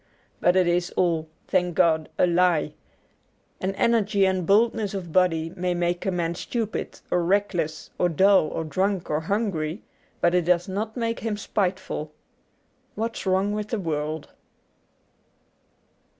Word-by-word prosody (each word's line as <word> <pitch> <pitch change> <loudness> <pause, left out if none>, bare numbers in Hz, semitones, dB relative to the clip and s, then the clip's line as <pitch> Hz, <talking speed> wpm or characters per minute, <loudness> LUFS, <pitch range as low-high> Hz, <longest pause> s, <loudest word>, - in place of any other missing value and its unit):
But 175 - +3
it 185 -1 +4
is 175 +1 +1
all, 165 -3 +1 0.2
thank 180 -2 +1
God, 160 -2 +3
a - - +5
lie. 175 -3 +2 0.9
An 190 +1 -2
energy 210 -4 +2
and 185 -3 0
boldness 210 0 +2
of 175 -4 -5
body 165 -3 +2
may 180 -1 -1
make 175 +1 -1
a - - +2
man 170 -2 -1
stupid 220 +5 -4
or 175 - +2
reckless 175 -4 -1
or 180 - +3
dull 190 +1 +4
or 165 - -3
drunk 185 +2 -1
or 150 - +1
hungry, 175 -2 -2 0.4
but 175 - +3
it 180 -2 +2
does 175 0 +2
not 215 +4 -3
make 230 -1 -1
him 220 -2 -2
spiteful. 185 -6 -2 0.9
^What's 225 -2 -3
Wrong 190 +2 +2
with 210 0 -3
the 225 -1 -2
World.' 155 -3 -3
180 Hz, 145 wpm, -25 LUFS, 170-200 Hz, 0.9 s, a